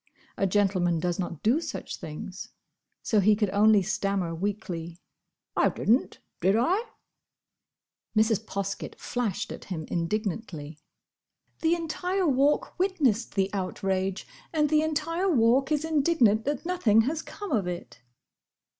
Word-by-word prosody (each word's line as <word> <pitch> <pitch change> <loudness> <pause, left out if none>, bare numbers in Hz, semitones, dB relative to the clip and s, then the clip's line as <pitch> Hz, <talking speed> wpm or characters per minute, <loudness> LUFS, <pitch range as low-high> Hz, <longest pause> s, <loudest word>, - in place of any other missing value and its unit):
A 195 - +1
gentleman 185 -4 +2
does 175 +2 -1
not 170 -4 -4
do 250 +9 +3
such - - -5
things. 170 +5 -7 0.5
So 220 - +2
he 210 +2 +5
could 205 -2 0
only 205 0 +5
stammer 195 -3 -1
weakly, 175 -2 -4 0.6
"I - - +4
didn't, 235 +6 +1 0.2
did 190 +4 +3
I?" 360 - +2 1.3
Mrs. 220 -1 +3
Poskett 200 0 -4
flashed 240 -6 -2
at - - -8
him 160 -5 -5
indignantly. 170 -4 -3 0.8
"The 330 +1 +3
entire 360 +3 -1
Walk 280 +5 +2
witnessed 285 - +1
the 195 -1 +1
outrage, 190 0 -2 0.3
and 300 -2 +2
the 305 0 +5
entire 325 +4 0
Walk 260 -1 +3
is 305 +1 +1
indignant 280 -9 +3
that 290 +2 -2
nothing 335 - +3
has 300 +7 -1
come 410 +2 -8
of 210 -8 +1
it." 175 -8 -6
215 Hz, 130 wpm, -27 LUFS, 190-300 Hz, 1.3 s, he